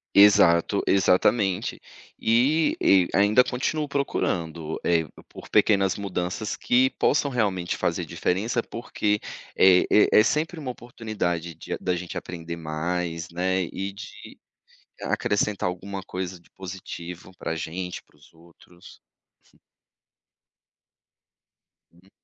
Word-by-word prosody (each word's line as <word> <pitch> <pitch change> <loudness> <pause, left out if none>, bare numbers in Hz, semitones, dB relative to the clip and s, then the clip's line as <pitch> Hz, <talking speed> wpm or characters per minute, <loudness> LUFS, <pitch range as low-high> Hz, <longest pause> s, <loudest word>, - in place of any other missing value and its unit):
Exato. 100 -2 +6
Exatamente. 95 +1 +2 0.4
E 130 +8 +3
e 95 -2 +5
ainda 105 +5 +5
continuo 145 +5 -2
procurando, 85 - -2
eh, 85 -2 +2
por - - -17 0.2
por - - -12
pequenas 100 -3 +3
mudanças 100 +1 -3
que 130 +2 +3
possam 145 -1 +1
realmente 95 -7 -1
fazer - - -1
diferença, 110 +6 -1
porque 105 -3 -2 0.4
é 90 -1 +6
é 105 - +6
é - - +6
sempre 160 +5 -1
uma 130 -4 -4
oportunidade 105 -9 -4
de - - -7
a - - -2
da 90 -1 -1
gente 90 0 -6
aprender 85 -1 -6
mais, 85 +1 -3
né. 95 +2 0
E 95 +3 -5
de 100 +1 -11 0.6
acrescentar 105 -2 0
alguma 95 +2 -6
coisa 90 0 -5
de 85 - -26
positivo 90 -1 -8
para - - -3
a 80 - -3
gente, 90 +3 -5
para - - -29
os 75 - -21
outros. 85 +1 -18 2.9
Hum. 85 - -23
É. 95 - -23
95 Hz, 125 wpm, -25 LUFS, 85-105 Hz, 2.9 s, Exato